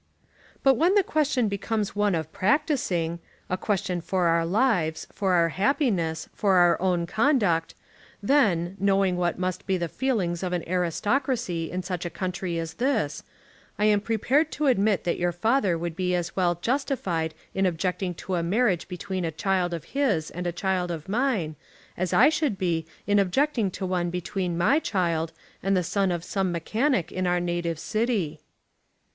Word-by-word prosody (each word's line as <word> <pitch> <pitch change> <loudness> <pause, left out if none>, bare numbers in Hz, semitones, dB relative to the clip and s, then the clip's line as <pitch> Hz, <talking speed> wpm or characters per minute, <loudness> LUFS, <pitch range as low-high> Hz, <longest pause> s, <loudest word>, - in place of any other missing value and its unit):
"But 270 -2 +5
when 350 +5 +3
the 405 - +5
question 290 -8 +1
becomes 205 +1 -2
one 205 -2 +2
of 160 -1 -3
practising, 195 - 0 0.3
a - - +2
question 185 -3 -1
for 185 +1 0
our 165 0 +2
lives, 180 -6 +1
for 190 -2 0
our 170 -1 +4
happiness, 190 - 0
for 195 -2 +2
our 175 -2 +4
own 180 -2 +1
conduct, 205 - +1 0.4
then, 200 - +2
knowing 195 -1 +2
what 175 -1 0
must 185 0 -3
be 190 -1 +2
the 170 -1 -2
feelings 185 -7 -1
of 180 -1 -2
an 175 -2 -2
aristocracy 185 - 0
in 185 0 -3
such 180 -1 -4
a 175 - -3
country 180 -1 -3
as 165 -1 -4
this, 220 - 0 0.6
I 210 - +2
am 210 -1 +4
prepared 255 +8 +1
to 300 - -1
admit 215 -6 +2
that 175 - -1
your 175 0 +1
father 195 0 +1
would 170 0 -4
be 180 0 0
as 175 -1 -3
well 175 -2 +2
justified 185 - -1 0.2
in 190 0 +2
objecting 180 +1 -2
to 190 - -3
a 175 - +1
marriage 190 +1 +1
between 185 0 -4
a 165 - 0
child 180 +2 0
of 170 -2 -4
his 230 - 0
and 180 0 -4
a - - 0
child 180 0 -1
of 165 -3 -5
mine, 210 - 0 0.4
as 185 0 -2
I - - +6
should 300 -9 0
be 165 -4 -1 0.2
in 205 0 +3
objecting 225 +3 +1
to 190 +1 -5
one 180 -1 0
between 180 0 -3
my 225 - +4
child 170 - -1 0.3
and 195 0 +1
the 180 - +1
son 195 +2 0
of 170 -1 -2
some 190 -1 -1
mechanic 215 - 0
in 185 0 -1
our 180 0 +2
native 175 -1 -2
city." 210 -6 -1
185 Hz, 175 wpm, -26 LUFS, 170-215 Hz, 0.6 s, I